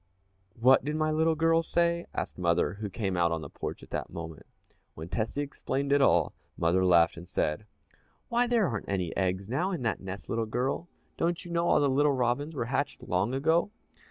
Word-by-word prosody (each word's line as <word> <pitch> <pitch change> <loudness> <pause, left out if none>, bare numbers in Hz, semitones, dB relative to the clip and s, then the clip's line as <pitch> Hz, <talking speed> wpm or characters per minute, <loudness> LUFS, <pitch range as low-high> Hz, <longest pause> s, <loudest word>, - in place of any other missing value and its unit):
"What 130 +3 +6
did 150 +3 -2
my 155 0 +1
little 160 +1 +2
girl 165 +1 +3
say?" 170 +1 0
asked - - -4
mother, 85 -1 +2
who 105 -2 -3
came 95 -1 -2
out 85 -1 +2
on 80 -1 -1
the - - -9
porch - - -6
at - - -15
that - - -3
moment. 80 -2 -8 0.5
When 80 +2 -8
Tessie 115 +8 -1
explained 140 0 -3
it 140 0 +4
all, - - +3 0.2
mother 85 +3 +2
laughed 85 -3 +4
and 85 +1 -9
said, 80 +8 -1 0.6
"Why, 240 +1 +2
there 235 -5 +3
aren't 110 -7 -4
any 90 -4 -2
eggs 95 +1 -1
now 140 - 0
in 175 -9 -3
that 115 - -1
nest, 95 +1 -7
little 115 -1 -1
girl 130 +9 -2 0.3
don't 170 +2 -1
you 175 - -8
know 170 0 +1
all - - +5
the 145 - +3
little 140 +2 +3
robins 130 +5 -1
were 120 - -1
hatched 135 +1 -2
long 105 +1 0
ago?" 160 +7 +2
130 Hz, 205 wpm, -29 LUFS, -, 0.6 s, What